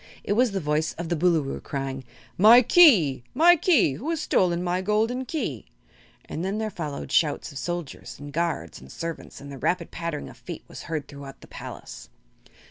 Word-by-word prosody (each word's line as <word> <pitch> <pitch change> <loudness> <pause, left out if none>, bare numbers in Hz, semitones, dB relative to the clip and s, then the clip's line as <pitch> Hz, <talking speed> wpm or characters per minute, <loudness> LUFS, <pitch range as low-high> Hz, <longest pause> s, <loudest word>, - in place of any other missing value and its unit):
It - - 0
was 245 +3 +3
the 200 -2 -2
voice 150 -1 -1
of 170 0 -6
the 170 - +1
Boolooroo, 160 -4 +1
crying: 135 -2 -5 0.3
"My 230 +6 +8
Key 215 - +5
my 340 +5 +7
Key! 300 - +3
Who 285 +8 -5
has 330 -2 -1
stolen 175 -7 +1
my 180 +1 -1
golden 220 +6 0
Key?" 220 - -4 0.6
And 165 - -5
then 195 +3 -2
there 220 -1 -2
followed 155 -6 -6
shouts 150 -1 +1
of 140 - -7
soldiers 175 -4 -5
and 145 0 -10
guards 160 - -2
and 65 +1 -13
servants 165 -1 -7
and 140 0 -10
the 135 - -8
rapid 175 +3 -1
pattering 165 -3 -4
of - - -13
feet 170 -3 -8
was - - -10
heard 155 -4 -3
throughout 140 -1 -11
the - - -14
palace. - - -10
170 Hz, 190 wpm, -25 LUFS, 145-215 Hz, 0.6 s, My